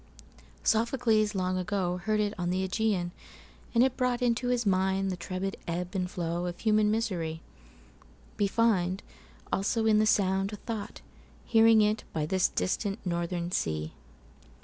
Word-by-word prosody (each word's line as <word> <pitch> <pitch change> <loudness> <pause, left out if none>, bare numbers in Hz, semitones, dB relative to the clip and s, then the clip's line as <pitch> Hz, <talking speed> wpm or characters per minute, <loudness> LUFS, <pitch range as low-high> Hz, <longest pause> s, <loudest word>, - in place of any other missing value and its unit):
Sophocles 220 -2 +2
long 185 -1 0
agoHeard 185 +1 -1
it 210 -1 0
on 175 -2 -2
the 190 +1 0
Ægæan, 185 -3 0 0.6
and 235 - +6
it 260 -1 +1
broughtInto 245 -1 +1
his 245 -2 +1
mind 190 0 +1
the - - -2
turbid 185 +2 -4
ebb 180 +2 -3
and 185 -2 -1
flowOf 175 0 -3
human 215 -1 +3
misery; 180 -8 -2 1.0
weFind 200 -3 +2 0.5
also 220 +3 +1
in 215 -1 +4
the 215 - +3
sound 195 -1 +2
a - - -2
thought, 215 0 -6 0.4
Hearing 225 -1 +6
it 210 +1 +1
by 155 -2 -1
this 185 +3 +2
distant 200 +2 -1
northern 175 0 -2
sea. 80 - -2
195 Hz, 135 wpm, -29 LUFS, 180-220 Hz, 1.0 s, and